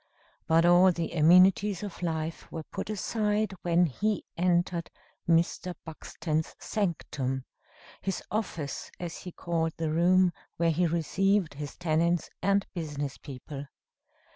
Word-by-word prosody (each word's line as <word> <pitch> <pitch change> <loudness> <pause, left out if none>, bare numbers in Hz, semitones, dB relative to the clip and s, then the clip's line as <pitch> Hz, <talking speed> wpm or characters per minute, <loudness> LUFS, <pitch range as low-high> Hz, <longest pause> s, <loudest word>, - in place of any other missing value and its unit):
But 165 +1 +4
all 175 +2 +7
the 170 -1 -3
amenities 180 +4 +5
of 200 -4 -7
life 160 -1 -3
were 160 - -5
put - - -6
aside 210 0 0
when 175 0 +3
he 205 +7 -1
entered 175 -1 +1 0.4
Mr. 170 +2 +2
Buxton's 160 0 -3
sanctum 140 - -2 0.6
his 195 -2 -3
"office," 175 -9 -3
as 175 -2 -5
he 180 - -8
called 165 -1 -1
the 160 -1 -1
room 180 +2 +4 0.2
where 170 0 +3
he 175 +2 +2
received 180 +3 +1
his 145 0 -7
tenants 170 0 +1
and 200 0 +2
business 145 -5 -4
people. 140 +1 -8
170 Hz, 125 wpm, -29 LUFS, 160-185 Hz, 0.6 s, all